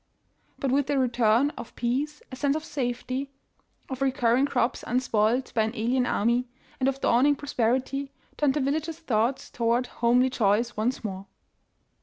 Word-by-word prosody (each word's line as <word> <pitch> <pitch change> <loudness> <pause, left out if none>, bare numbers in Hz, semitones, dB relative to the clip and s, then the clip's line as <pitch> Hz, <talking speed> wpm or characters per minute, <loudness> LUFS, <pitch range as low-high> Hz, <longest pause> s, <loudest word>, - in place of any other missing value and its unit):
But 270 - -1
with 275 0 +2
the 285 -1 +1
return 245 +1 +3
of 235 - -9
peace, 275 +6 -2
a - - -5
sense 280 +2 +1
of 315 0 -4
safety, 255 0 -3 0.6
of 260 0 -6
recurring 260 0 +2
crops 250 -3 0
unspoiled 245 0 +1
by 225 - +2
an 220 +2 -1
alien 245 +3 +1
army, 235 +4 +1 0.3
and 260 0 +2
of 270 0 -4
dawning 275 +5 +4
prosperitj^, 265 0 -1 0.3
turned 290 -2 +1
the 295 - +1
villagers' 310 +4 -1
thoughts 245 -4 -1
to 235 - -5
ward 235 +2 +2
homely 245 +1 +2
joys 230 +1 +1
once 235 +5 -1
more. 195 -2 -5
255 Hz, 160 wpm, -26 LUFS, 235-275 Hz, 0.6 s, dawning